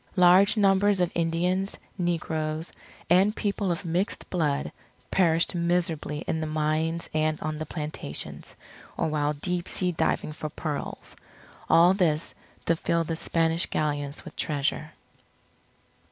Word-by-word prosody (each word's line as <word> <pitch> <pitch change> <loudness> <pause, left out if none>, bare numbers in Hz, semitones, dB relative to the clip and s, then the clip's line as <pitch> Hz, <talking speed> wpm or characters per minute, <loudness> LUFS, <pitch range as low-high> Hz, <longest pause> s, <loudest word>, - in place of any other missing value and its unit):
Large 185 +3 +6
numbers 200 0 +4
of 180 -1 +1
Indians, 175 +4 0 0.2
negroes 160 -2 -2 0.3
and 190 +5 +4
people 200 -3 -1
of 175 +3 -3
mixed 175 +5 -1
blood, 150 -5 0 0.4
perished 165 -3 +3
miserably 170 -4 -1
in 160 - -1
the 155 - -2
mines 155 +2 -1
and 155 0 +1
on 155 0 -3
the 155 - -4
plantations, 150 - -5 0.4
or - - 0
while 150 -1 0
deep 175 +4 -2
sea 180 -1 +3
diving 160 -2 0
for 155 0 -5
pearls, 150 -1 -5 0.5
all 170 +3 +6
this 165 -5 0 0.3
to 170 - +3
fill 165 +1 0
the 165 0 -3
Spanish 165 0 0
Galleons 145 -1 -2
with - - -10
treasure. 150 +1 -1
165 Hz, 130 wpm, -27 LUFS, 155-180 Hz, 0.5 s, Large